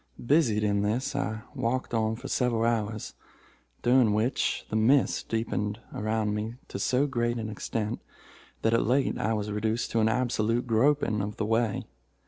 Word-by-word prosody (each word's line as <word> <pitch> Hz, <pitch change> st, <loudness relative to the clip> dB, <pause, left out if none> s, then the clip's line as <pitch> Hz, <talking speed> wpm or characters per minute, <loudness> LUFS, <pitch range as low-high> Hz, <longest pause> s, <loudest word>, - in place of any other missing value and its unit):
"Busied 120 Hz, -7 st, +3 dB
in 100 Hz, -1 st, +2 dB
this, 125 Hz, +7 st, -1 dB
I 110 Hz, +1 st, -2 dB
walked 125 Hz, +1 st, -2 dB
on 110 Hz, -1 st, +1 dB
for 130 Hz, +4 st, -8 dB
several 120 Hz, -4 st, +1 dB
hours, 110 Hz, -2 st, -1 dB, 0.7 s
during 120 Hz, -3 st, +4 dB
which 115 Hz, +5 st, 0 dB
the -, -, -1 dB
mist 125 Hz, +5 st, +3 dB
deepened 110 Hz, -2 st, -1 dB
around 110 Hz, 0 st, -1 dB
me 110 Hz, +2 st, -3 dB
to -, -, -5 dB
so 130 Hz, +3 st, +2 dB
great 120 Hz, -3 st, -1 dB
an 110 Hz, -1 st, -4 dB
extent 110 Hz, +1 st, -3 dB, 0.6 s
that 115 Hz, -, +3 dB
at 115 Hz, -, +4 dB
length 135 Hz, +3 st, +1 dB
I 110 Hz, +2 st, +1 dB
was 105 Hz, -1 st, -2 dB
reduced 110 Hz, +2 st, -1 dB
to 115 Hz, -, +1 dB
an 110 Hz, 0 st, +3 dB
absolute 120 Hz, 0 st, 0 dB
groping 115 Hz, -2 st, +2 dB
of 105 Hz, +1 st, -4 dB
the -, -, -1 dB
way. 115 Hz, -1 st, 0 dB
115 Hz, 165 wpm, -28 LUFS, 110-120 Hz, 0.7 s, during